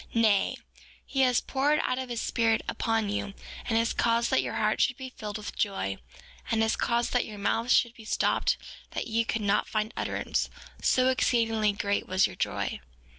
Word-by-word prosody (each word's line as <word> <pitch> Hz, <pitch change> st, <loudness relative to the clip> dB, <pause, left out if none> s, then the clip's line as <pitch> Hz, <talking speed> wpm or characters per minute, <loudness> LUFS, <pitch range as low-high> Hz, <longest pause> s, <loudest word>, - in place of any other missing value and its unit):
Nay; 215 Hz, -4 st, +3 dB, 0.5 s
he 270 Hz, -, -3 dB
has 250 Hz, -2 st, +4 dB
poured 285 Hz, +3 st, +1 dB
out 255 Hz, -, 0 dB
his 245 Hz, -3 st, -3 dB
Spirit 225 Hz, -1 st, +1 dB
upon 225 Hz, -2 st, 0 dB
you, 200 Hz, -1 st, -3 dB, 0.3 s
and 225 Hz, -, +2 dB
has 230 Hz, +1 st, +2 dB
caused 235 Hz, 0 st, +2 dB
that -, -, +4 dB
your -, -, -4 dB
hearts -, -, +2 dB
should 250 Hz, -, -4 dB
be 260 Hz, -1 st, -7 dB
filled 210 Hz, -4 st, -6 dB
with 210 Hz, -, -7 dB
joy, 145 Hz, -, -1 dB, 0.5 s
and 225 Hz, -1 st, +2 dB
has 220 Hz, -, +2 dB
caused 235 Hz, 0 st, 0 dB
that 245 Hz, -, +3 dB
your 210 Hz, -, -8 dB
mouths 225 Hz, +4 st, 0 dB
should 235 Hz, -1 st, +4 dB
be 230 Hz, -, -13 dB
stopped 215 Hz, -, +1 dB, 0.4 s
that -, -, -2 dB
ye 230 Hz, 0 st, +1 dB
could 225 Hz, -1 st, -2 dB
not 200 Hz, -, +2 dB
find 215 Hz, +1 st, -1 dB
utterance, -, -, -1 dB, 0.3 s
so 255 Hz, 0 st, +3 dB
exceedingly 225 Hz, -4 st, +2 dB
great 200 Hz, 0 st, -1 dB
was 185 Hz, +1 st, +3 dB
your -, -, -4 dB
joy. -, -, -2 dB
225 Hz, 185 wpm, -28 LUFS, 210-240 Hz, 0.5 s, has